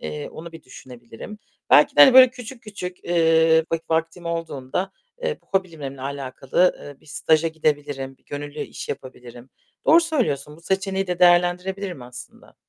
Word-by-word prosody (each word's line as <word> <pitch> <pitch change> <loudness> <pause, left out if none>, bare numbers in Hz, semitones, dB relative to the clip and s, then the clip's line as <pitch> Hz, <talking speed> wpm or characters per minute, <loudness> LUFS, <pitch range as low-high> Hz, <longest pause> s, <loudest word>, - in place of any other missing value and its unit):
Eee, 75 -1 -6
onu 165 +1 -10
bir 165 -1 -12
düşünebilirim. 125 - -12 0.3
Belki - - +5
de, - - +6
hani, 265 - +9
böyle, 255 -1 +9
küçük 250 -1 -11
küçük, 185 -4 -7
ııı, 160 -1 +3
vak 165 0 -3
vaktim 165 +2 -2
olduğunda, 165 +2 -4 0.3
eee, 485 -2 -2
bu - - -34
hobilerimle 150 -7 -9
alakalı, 135 +5 -1
ııı, 145 -1 -12
bir - - -24
staja 160 +2 +1
gidebilirim, 145 -4 -2
bir - - -38
gönüllü 145 +1 -7
iş - - -7
yapabilirim. 125 -1 -9 0.4
Doğru 330 +2 +7
söylüyorsun. 225 - -2
Bu - - -18
seçeneği 190 +2 -2
de 180 -1 -3
değerlendirebilirim 180 -1 +2
aslında. 125 0 -12
165 Hz, 155 wpm, -22 LUFS, 140-185 Hz, 0.4 s, hani